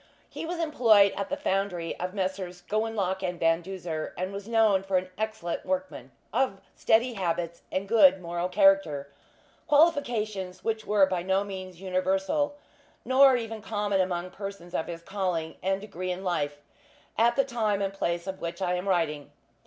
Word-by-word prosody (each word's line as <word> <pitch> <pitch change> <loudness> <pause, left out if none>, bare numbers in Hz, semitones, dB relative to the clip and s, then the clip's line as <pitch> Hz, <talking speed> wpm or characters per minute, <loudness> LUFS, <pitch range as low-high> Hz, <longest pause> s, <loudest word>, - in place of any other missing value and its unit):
He 325 - -6
was 350 +1 -3
employed 230 -11 +4
at 200 -1 -3
the - - -2
foundry 190 -3 -1
of 180 +2 -4
Messrs. 185 -2 -3
Gowanlock 205 -3 -1
and 180 -2 -3
Van 165 +1 +3
Duzer, 170 -4 -5
and 185 +2 -3
was 200 +1 -7
known 220 -4 +4
for 195 -1 0
an 185 0 -3
excellent 215 -5 -3
workman, 280 0 -3 0.2
of 250 -8 +1 0.2
steady 230 +3 +3
habits, 170 -4 -2
and 190 +1 -2
good 195 -4 +6
moral 175 0 -3
character 185 -8 +3 0.6
qualifications 240 - +1
which 220 -1 -2
were 205 -2 +5
by 185 -2 -2
no 190 +2 +1
means 185 -3 -8
universal, 195 +10 0 0.5
nor 265 0 +6
even 225 -2 -5
common, 205 -2 0
among 180 -1 -2
persons 195 -3 -8
of 160 - -1
his 170 -1 -7
calling 180 -4 -2
and 195 +1 0
degree 185 -3 -5
of 180 +1 -5
life, 150 -6 -1 0.6
at 235 +1 +3
the 275 - +3
time 220 -6 0
and 195 -1 -1
place 170 -3 -2
of 190 0 -6
which 170 +1 -4
I 180 -2 0
am 180 +2 -2
writing. 155 -5 0
195 Hz, 170 wpm, -28 LUFS, 180-215 Hz, 0.6 s, good